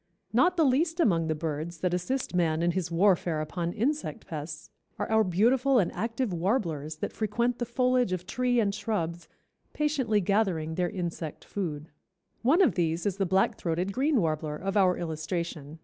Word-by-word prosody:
Not 355 +10 +3
the 325 - +4
least 320 +6 +2
among 170 - +3
the 155 - 0
birds 160 +2 -4
that 180 -1 0
assist 255 +9 -2
man 165 -2 +1
in 175 - +3
his 180 -1 -2
warfare 175 -2 +2
upon 170 +3 -3
insect 245 +3 -2
pests 155 0 -7 0.3
are - - -2
our 220 0 +5
beautiful 240 +8 +3
and 190 -7 +2
active 230 +2 -2
warblers 165 - -1
that 155 - -4
frequent 235 +3 -1
the 240 - -2
foliage 250 -2 +2
of 180 -1 -3
tree 250 +3 +1
and 200 -3 +1
shrubs 175 -6 -3 0.4
patiently 275 -8 +1
gathering 185 -5 0
their 175 +1 0
insect 170 -4 -5
food. 160 -6 -4 0.5
One 310 +11 +5
of 255 - +3
these 165 +1 0
is 200 -2 0
the 195 -2 0
Black 190 +2 +2
throated 175 +3 -1
Green 275 +2 +2
Warbler 155 -3 -1
of 195 +5 -3
our 185 -3 +4
illustration. 160 -2 -4
185 Hz, 175 wpm, -28 LUFS, 165-235 Hz, 0.5 s, our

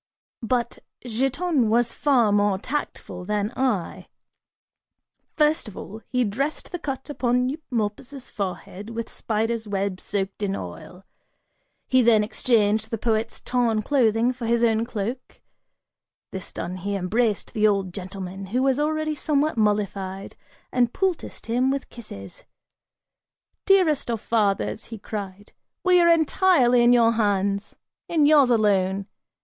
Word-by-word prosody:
(But) 240 0 -1 0.3
Giton 270 +3 0
was 235 +1 +2
far 250 -7 +3
more 205 -1 +2
tactful 200 -7 -5
than 210 +3 -1
I: 240 -10 -1 1.3
first 300 -4 +2
of 210 - -10
all, 220 +3 -8
he 250 -1 +1
dressed 265 +8 -3
the 355 - -4
cut 270 -4 -5
upon 250 -2 +1
Eumolpus' 255 -2 -4
forehead, 200 +1 -5
with 230 0 -5
spider's 225 0 -2
web 195 -2 -2
soaked 195 0 -3
in 195 -1 -1
oil; 180 - -9 0.8
he 255 0 +4
then 225 -3 +5
exchanged 220 -1 +1
the 225 - -2
poet's 225 0 -1
torn 235 -3 0
clothing 240 -3 +2
for 240 -2 -5
his 235 0 +2
own 225 -1 +2
cloak; 235 +2 -5 0.9
this 190 -1 -7
done, 180 +1 -5
he 200 +2 -3
embraced 205 +3 0
the 215 0 +3
old 195 -3 0
gentleman, 190 0 -6
who 250 +7 0
was 270 0 +2
already 310 +1 0
somewhat 300 0 0
mollified, 200 -3 -1 0.4
and 245 -1 +2
poulticed 375 -3 -2
him 245 +3 +1
with 275 0 -2
kisses. 100 - -10 1.2
"Dearest 365 -10 +3
of 230 -2 -1
fathers," 210 -1 0
he 225 - -8
cried, 205 -1 -7 0.3
"we 365 -1 +5
are 340 - +5
entirely 315 -6 +4
in 240 - +6
your 235 -2 +5
hands! 200 -2 0 0.3
In 315 -3 +3
yours 290 -3 +6
alone! 200 -4 +2
230 Hz, 135 wpm, -24 LUFS, 205-260 Hz, 1.3 s, in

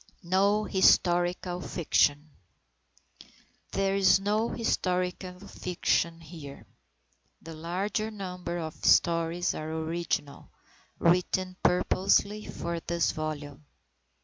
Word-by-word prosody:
NO 200 +4 +2
HISTORICAL 180 -2 +2
FICTION 150 -3 +1 1.4
There 195 0 +1
is 195 -1 +5
no 210 +3 0
historical 180 -3 -2
fiction 170 -3 -1
here. 155 -4 -10 0.8
The 165 - -8
larger 185 +7 -2
number 180 -4 -5
of 160 -2 -6
the - - 0
stories 170 +1 +3
are 155 +1 -5
original, 160 -3 -3 0.5
written 180 +2 +1
purposely 200 +3 +2
for 170 0 -4
this 170 0 0
volume. 150 -2 -5
175 Hz, 95 wpm, -28 LUFS, 165-190 Hz, 1.4 s, is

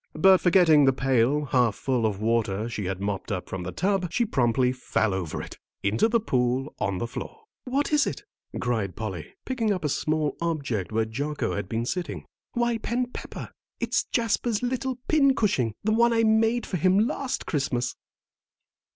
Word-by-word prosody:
But 190 +4 +6
forgetting 165 -5 +5
the 135 - +4
pail, 135 +3 +2
half 125 -5 +2
full 125 -4 0
of 100 -2 -3
water 110 -1 0
she 105 -4 -4
had 95 0 -3
mopped 100 +1 -3
up 90 -3 -3
from 95 - -5
the 90 +1 -5
tub, 185 - 0
she 240 +6 +1
promptly 125 - +2
fell 120 -5 0
over 90 -5 -3
it, - - -11 0.2
into 105 - +3
the 230 +1 +2
pool 130 - 0
on 100 -3 -1
the 105 - -2
floor. 445 - -7 0.2
"What 275 +4 -1
is 295 -2 +4
it?" 420 - -4 0.4
cried 110 -7 -1
Polly, 95 -8 -6
picking 235 -5 0
up 180 -5 -1
a - - +1
small 155 0 0
object 140 - -2
where 110 0 +1
Jocko 145 +7 -2
had 100 -2 -4
been 115 +1 -1
sitting. 180 +7 -4 0.3
"Why, 240 -1 0
Ben 245 +3 -2
Pepper, - - -7 0.3
it's - - 0
Jasper's 230 -1 0
little 255 +1 -1
pincushion, 225 - +2
the 215 +1 +2
one 235 +1 +4
I 230 0 +3
made 225 +1 +3
for 185 - -2
him 185 +4 +3
last 275 0 -3
Christmas!" 125 -5 -1
145 Hz, 175 wpm, -26 LUFS, -, 0.4 s, But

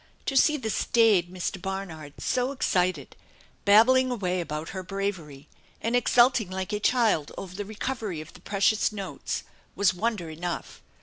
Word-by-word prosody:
To 275 - -2
see 300 +3 +5
the 225 -5 -3
staid 205 -8 +3
Mr. 185 0 -4
Barnard 170 -7 -5
so 255 +1 0
excited, 180 - 0 0.5
babbling 255 +6 +6
away 185 -7 -1
about 155 -1 -5
her 190 - -5
bravery 180 -7 -5 0.3
and 230 +2 -1
exulting 245 -3 +4
like 190 +2 -4
a 210 - 0
child 215 - +2
over 185 -2 -7
the 205 +2 -5
recovery 215 -4 -4
of 155 0 -10
the 180 - -15
precious 205 +3 +2
notes, 200 -2 -4 0.3
was 200 -2 +3
wonder 205 -2 -2
enough. 170 +2 -5
195 Hz, 150 wpm, -27 LUFS, 180-225 Hz, 0.5 s, babbling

